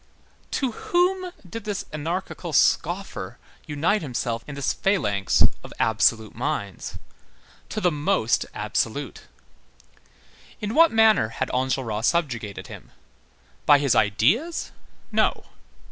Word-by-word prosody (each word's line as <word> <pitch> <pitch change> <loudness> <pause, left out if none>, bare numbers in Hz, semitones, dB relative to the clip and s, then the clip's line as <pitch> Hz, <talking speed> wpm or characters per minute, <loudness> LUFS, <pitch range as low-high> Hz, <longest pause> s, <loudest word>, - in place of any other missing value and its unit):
To 265 -3 -1
whom 360 +8 0 0.2
did 225 +5 -7
this 205 -2 -3
anarchical 165 +5 -4
scoffer - - +1 0.3
unite 160 +8 +1
himself 120 -5 -3
in 145 - -7
this 140 -1 0
phalanx 105 - +1 0.2
of - - -10
absolute 110 -1 +2
minds? 100 -3 -4 0.7
To 215 - -3
the 180 -4 +2
most 155 +6 +1
absolute. - - -2 1.3
In 210 -1 -3
what 330 +3 +6
manner 220 - +4
had 110 - -3
Enjolras 125 -4 0
subjugated 120 - -1
him? - - -11 0.8
By 145 - +8
his 140 -3 +2
ideas? 130 - +2 0.4
No. - - +1
150 Hz, 110 wpm, -24 LUFS, -, 1.3 s, By